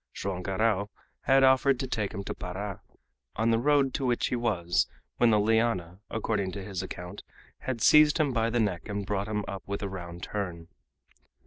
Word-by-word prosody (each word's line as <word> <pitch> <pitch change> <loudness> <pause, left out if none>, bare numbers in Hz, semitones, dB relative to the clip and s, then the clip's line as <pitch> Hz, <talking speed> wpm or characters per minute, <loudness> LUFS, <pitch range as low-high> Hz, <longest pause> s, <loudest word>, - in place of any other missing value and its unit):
Joam 95 -2 -3
Garral 100 +1 0 0.4
had 135 0 +5
offered 130 0 +4
to - - -1
take 105 -5 -2
him 100 - -5
to - - -4
Para, 95 +2 -6 0.5
on 115 +2 +2
the 115 - +3
road 140 0 +3
to - - -2
which 120 -1 +1
he - - 0
was 95 -8 +1 0.3
when 120 - +5
the 105 -2 +4
liana, 105 -5 +1
according 105 -3 -1
to 100 - -5
his 95 -2 -4
account, 90 +1 -7 0.4
had 125 -4 -4
seized 150 0 +7
him 145 -4 +2
by 115 -1 +1
the 120 +1 0
neck 105 -3 -1
and 100 -1 -3
brought 100 +1 -2
him 105 -2 -2
up 100 -1 -5
with 100 +1 -3
a - - -1
round 85 -2 -7
turn. 85 -5 -4
105 Hz, 195 wpm, -28 LUFS, 95-120 Hz, 0.5 s, seized